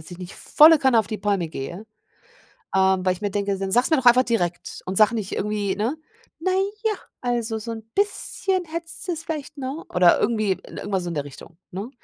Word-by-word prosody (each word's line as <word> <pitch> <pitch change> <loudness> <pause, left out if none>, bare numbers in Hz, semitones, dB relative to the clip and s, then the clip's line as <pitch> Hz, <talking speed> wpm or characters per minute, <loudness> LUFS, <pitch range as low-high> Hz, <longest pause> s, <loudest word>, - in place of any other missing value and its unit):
dass 155 - -12
ich 175 - -8
nicht 180 0 -8
volle 315 +1 +6
Kanne 260 -4 +4
auf 220 - +1
die 215 -2 -5
Palme 195 -5 0
gehe, 170 +8 -7 0.9
ähm, 190 -1 +3
weil 185 - +3
ich 180 - -13
mir 205 -1 -2
denke: 200 0 -1
„Dann 195 -1 -3
sag's 245 - +3
mir 315 - +5
doch 260 -2 -2
einfach 245 +1 +7
direkt 180 -9 -2
und 185 +1 -3
sage 220 +2 +5
nicht 210 -4 -3
irgendwie”, 205 -1 -1
ne, 235 +9 -1 0.4
„na 355 +4 -1 0.3
ja, 440 - +3 0.3
also, 235 -2 -1
so 230 +2 -5
'n 225 -1 -7
bisschen 390 -2 0
hättest 335 +3 -6
du - - +1
es 325 0 -6
vielleicht”, 305 -3 -5
ne? 275 +5 -5
Oder 180 -1 +5
irgendwie 215 -3 +1
irgendwas 195 -2 -3
so - - -3
in 170 - -4
der 145 -2 -2
Richtung, 160 +4 -13
ne? 200 +7 -5
215 Hz, 220 wpm, -23 LUFS, 190-265 Hz, 0.9 s, einfach